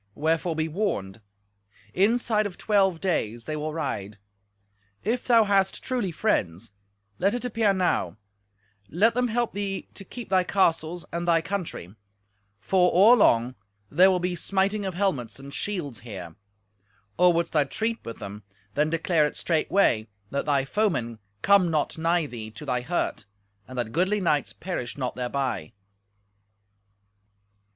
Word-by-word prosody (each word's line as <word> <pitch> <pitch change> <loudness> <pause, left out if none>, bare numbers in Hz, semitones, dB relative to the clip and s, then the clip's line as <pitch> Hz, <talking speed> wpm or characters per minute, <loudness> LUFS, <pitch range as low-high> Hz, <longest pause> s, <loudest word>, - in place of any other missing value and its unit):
Wherefore 160 +2 0
be 160 0 0
warned. 130 - -3 0.7
Inside 215 +1 +2
of 185 - -11
twelve 195 -5 +2
days 120 - -1
they 155 - -3
will 150 +1 -3
ride. 105 -10 -4 0.9
If 235 +6 -1
thou 230 -2 +6
hast 195 -2 +1
truly 245 -8 -1
friends, 105 - -1 0.5
let 200 +5 +2
it 245 - -4
appear 225 -3 +2
now; 175 - 0 0.7
let 210 +8 +3
them 250 +1 +1
help 240 0 -1
thee 200 -1 -4
to 195 - -9
keep 240 +3 -9
thy 185 -1 +3
castles 170 -2 +1
and 170 +1 -2
they 165 -1 +4
country, 175 - -5 0.7
for, 180 - +3
or 210 +7 +7
long, 120 - +3 0.4
there 180 +6 +6
will 185 - +3
be 180 0 -1
smiting 195 +3 0
of 190 -2 -3
helmets 140 - -1
and 140 +1 -10
shields 165 - -3
here. 95 -8 -8 0.8
Or 180 0 +7
wouldst 170 0 -1
thou 150 -3 +3
treat 225 +10 -3
with 115 - -7
them, 100 +1 -8 0.3
then 150 +1 +1
declare 165 -1 +2
it - - -8
straightway, 155 - +2 0.2
that 140 - -2
thy 140 -2 +2
foemen 135 - -1 0.2
come 200 -3 +5
not 155 0 -1
nigh 165 0 +2
thee 115 -6 -7
to 110 +7 -10
thy 125 -3 0
hurt, 170 - -2 0.4
and 130 - -9
that 120 -2 -2
goodly 185 - +1
knights 150 -6 +1
perish 160 -11 -5
not 130 -3 -2
thereby." 125 -1 -3
170 Hz, 150 wpm, -26 LUFS, 135-200 Hz, 0.9 s, or